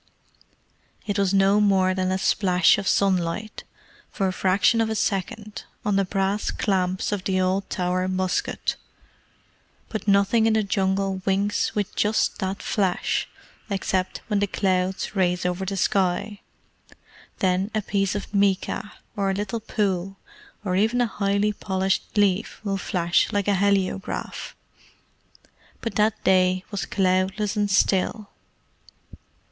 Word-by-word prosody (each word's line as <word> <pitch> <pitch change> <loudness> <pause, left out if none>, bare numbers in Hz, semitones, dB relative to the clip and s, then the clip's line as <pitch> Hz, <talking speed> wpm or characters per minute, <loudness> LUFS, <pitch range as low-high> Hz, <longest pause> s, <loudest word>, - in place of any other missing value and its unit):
It 205 -1 -1
was 195 -2 +2
no 195 +1 +4
more 190 -2 +3
than 185 0 -1
a 190 - +1
splash 185 -2 +3
of 200 - -4
sunlight, 195 +2 0 0.5
for 195 - -1
a 185 - -1
fraction 195 +5 +2
of 225 - 0
a 220 - -1
second, 210 +1 -2 0.2
on 205 -1 +1
the 195 0 +2
brass 195 +2 -1
clamps 185 -2 -1
of 205 -3 -2
the 190 -1 0
old 185 +1 0
Tower 180 0 -1
musket, 185 0 -1 1.1
but 215 -1 -5
nothing 200 +3 +4
in 225 - +3
the 220 -1 +2
Jungle 195 -1 0
winks 200 +2 0
with 205 -2 -2
just 210 +1 +1
that 190 0 -3
flash, 190 -4 0 0.4
except 190 -2 -1
when 210 -2 0
the 205 - +1
clouds 190 +1 -1
race 180 -2 +1
over 180 +1 -1
the 195 +1 -3
sky. 195 +2 0 1.0
Then 185 +1 +1
a 215 - 0
piece 195 0 0
of 205 0 -5
mica, 200 +1 0 0.2
or 195 -1 0
a 195 - 0
little 205 +3 -3
pool, 195 -3 -2 0.5
or 185 -2 0
even 220 +5 +2
a 245 - +4
highly 205 -1 0
polished 190 +1 -2
leaf 200 0 +1
will 200 -2 -1
flash 175 -3 +1
like 205 -1 -1
a 205 - +3
heliograph. 195 -1 -1 1.2
But 230 - -4
that 215 +1 +1
day 185 0 +3
was 200 -2 -3
cloudless 190 +2 0
and 205 -1 0
still. 195 +2 +1
195 Hz, 140 wpm, -24 LUFS, 185-205 Hz, 1.2 s, no